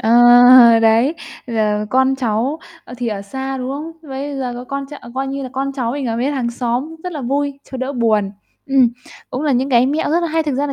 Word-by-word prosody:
Ờ, 225 - 0 0.7
đấy, 230 +8 +3 0.3
giờ 215 -2 -1
con 265 +1 +3
cháu, 250 +4 -1 0.3
ờ, 245 - -10
thì 245 -1 -3
ở 200 -2 -4
xa, 265 +6 -5
đúng 255 0 -4
không? 300 +4 -6 0.2
Bây 275 +2 -5
giờ 255 -2 -3
có 245 +1 -7
con 275 +1 -5
ch 285 - -16 0.2
coi 270 +1 -2
như 275 +1 -4
là 260 - -5
con 275 +1 -2
cháu 245 -4 -2
mình 280 -1 -3
ở 225 -1 -2
với 255 +5 0
hàng 255 -4 -2
xóm 250 +6 -3
rất 360 - -4
là 300 - -5
vui, 280 +2 -2
cho 265 - -5
đỡ 260 +2 -3
buồn. 220 -5 +1 0.4
Ừm, 270 -3 +4 0.4
cũng 260 - -4
là 295 - +1
những 260 +2 0
cái 245 0 +4
mẹo 295 +3 -1
rất 335 - +2
là 340 - -1
hay. 320 +1 0
Thực 295 -3 -2
ra 280 +3 -1
là 280 - -4
265 Hz, 245 wpm, -18 LUFS, 240-280 Hz, 0.7 s, Ừm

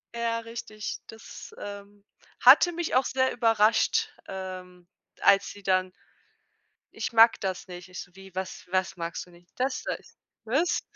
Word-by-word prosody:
Ja, 230 0 -1
richtig, 225 -2 -6
das, 225 -1 -11
ähm, 200 0 -9 0.4
hatte 285 +8 +8
mich 340 -1 -3
auch 260 +1 +4
sehr 260 0 +1
überrascht, 225 -2 +3 0.2
ähm, 185 -2 -8 0.3
als 195 0 +5
sie 205 - -11
dann 185 -1 +1 1.0
„Ich - - -3
mag 230 0 +6
das 190 -1 -3
nicht.“ 180 0 -10
Ich 185 - -8
so: 180 - -12
„Wie, 190 -1 -14
was 190 0 -5
was 185 0 -1
magst 170 -1 -4
du 180 - -19
nicht?“ 175 0 -20
„Das 260 +1 -1
da.“ - - -2
Ich - - -22
so: - - -26 0.3
„Was?“ 280 +10 +1
200 Hz, 165 wpm, -27 LUFS, 185-230 Hz, 1.0 s, hatte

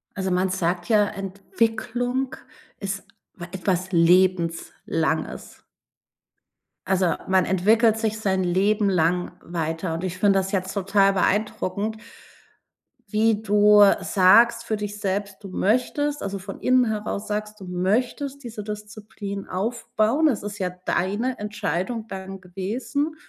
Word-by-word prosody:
Also, 190 -1 -2
man 185 +1 +1
sagt 175 -1 -1
ja, 210 -2 +4
Entwicklung 230 +6 -2 0.4
ist 195 0 -4 0.3
wa 175 - -7
etwas 185 0 -1
Lebenslanges. 170 -2 +1 1.2
Also, 185 -3 +2
man 190 -1 +4
entwickelt 215 +5 +3
sich 220 -1 -1
sein 190 -3 +1
Leben 200 +3 +2
lang 180 0 +1
weiter 165 0 -3
und 165 +3 -3
ich 185 0 -4
finde 195 0 +4
das 190 +1 -4
jetzt 190 -1 -1
total 195 0 +3
beeindruckend, 205 +1 -1 1.1
wie 215 +1 +1
du 210 0 +6 0.2
sagst 230 +5 +5
für 220 -2 -2
dich 205 0 -5
selbst, 200 0 -3
du 195 - -7
möchtest 255 +9 0
also, 200 0 -3
von 195 +1 -9
innen 255 -1 +4
heraus 215 -1 -3
sagst, 210 0 -4
du 190 - -9
möchtest 245 +10 -1
diese 220 -3 -6
Disziplin 210 -1 -7
aufbauen. 230 +7 0
Es 235 - -1
ist 205 0 -6
ja 185 -2 -1 0.2
deine 210 +8 0
Entscheidung 210 +1 -3
dann 190 -1 -7
gewesen, 215 - -3
200 Hz, 125 wpm, -24 LUFS, 185-220 Hz, 1.2 s, du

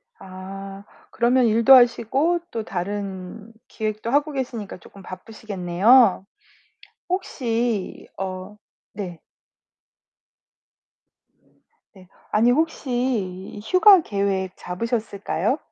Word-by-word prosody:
아 195 +1 -9 0.3
그러면 245 +1 +2
일도 230 +3 +5
하시고 255 +7 +3
또 225 - -3
다른 195 +2 -6 0.2
기획도 215 0 -4
하고 290 +2 +2
계시니까 245 -8 -5
쪼끔 195 +2 -16
바쁘시겠네요. 195 +2 +2 0.8
혹시 235 - -2
어 190 +2 -6 0.4
네. 180 -5 -7 2.7
네, 185 -3 -17 0.2
아니 230 +3 +4
혹시 245 - -2
휴가 370 - +6
계획 195 - -2
잡으셨을까요? 215 +1 -2
215 Hz, 185 characters per minute, -23 LUFS, 190-245 Hz, 2.7 s, 휴가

